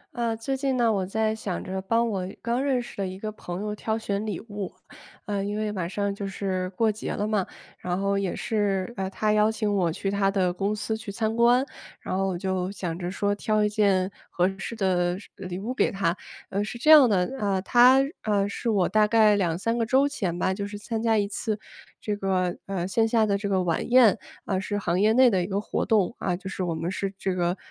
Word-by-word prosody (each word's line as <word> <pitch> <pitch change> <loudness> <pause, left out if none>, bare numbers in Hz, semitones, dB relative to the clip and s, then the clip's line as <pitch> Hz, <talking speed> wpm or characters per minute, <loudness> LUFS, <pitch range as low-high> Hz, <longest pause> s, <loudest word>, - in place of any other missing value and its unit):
呃， 230 -2 -1
最 250 +4 -2
近 265 -1 -1
呢， 235 -2 +3
我 195 -2 0
在 220 +2 0
想 210 -4 -4
着 190 0 -4
帮 230 +4 +1
我 190 -4 -2
刚 240 +3 -1
认 270 -3 +1
识 240 - -8
的 195 -1 -1
一 185 0 -7
个 215 +2 -5
朋 180 -4 -7
友 210 0 -3
挑 220 +1 -2
选 205 -2 -2
礼 210 - -3
物， 205 -4 -6 0.5
呃， 205 -2 -2
因 205 +1 -3
为 215 -1 -1
马 185 -5 -3
上 200 +2 -2
就 200 0 -5
是 185 -1 -2
过 220 +2 +3
节 215 - -5
了 210 - -1
嘛， 210 -3 0 0.3
然 180 0 -2
后 200 0 +1
也 195 -2 -1
是， 205 -1 -1
呃， 190 -1 -3
他 210 +2 0
邀 215 +1 +4
请 215 -2 -1
我 175 -4 +2
去 195 +4 -3
他 200 -1 +2
的 185 -3 +1
公 200 +3 -1
司 220 +1 -2
去 220 -1 -7
参 220 +2 -1
观， 240 +3 +4 0.3
然 - - -4
后 195 +1 +1
我 185 -2 -2
就 185 0 -2
想 180 -4 -4
着 175 -1 -3
说 200 +2 0
挑 215 +1 +1
一 210 - +2
件 200 -3 +2 0.2
合 180 +1 +2
适 230 - -5
的 180 -3 +1
是 200 - -13
呃， 190 - -6
礼 180 0 -5
物 220 +6 -4
给 - - +2
他。 195 -4 0 0.3
呃， 200 +2 -1
是 225 - -6
这 300 +6 +4
样 290 -6 +9
的， 190 +4 +1
呃， 200 -2 +1
他， 250 +5 +6 0.2
呃， 205 -2 +1
是 230 +3 -3
我 195 -5 +2
大 215 +2 +3
概 215 -1 +5
2-3 195 +4 0
个 - - +2
周 265 +5 +3
前 190 -12 -3
吧， 185 +1 +1
就 200 +1 -4
是 205 0 -7
参 220 +2 -4
加 225 -1 +2
一 205 -1 +1
次 210 +1 -3 0.4
这 210 - -2
个， 185 -3 0
呃， 185 -3 -2
线 225 +4 +2
下 225 -1 +3
的 200 -2 +1
这 200 0 -2
个 190 -2 +1
晚 165 +4 -1
宴， 240 -5 +6 0.3
啊， 190 -2 0
是 205 +2 -3
行 180 -2 0
业 215 +1 +5
内 255 0 +6
的 190 -3 +2
一 175 - -2
个 195 0 -1
活 210 - -2
动， 215 0 +2
啊， 180 - -1
就 190 +2 -9
是 - - -5
我 170 -2 -1
们 165 +2 -3
是 195 +1 -2
这 190 -1 -1
个， 175 +1 0
205 Hz, 260 characters per minute, -26 LUFS, 190-220 Hz, 0.5 s, 样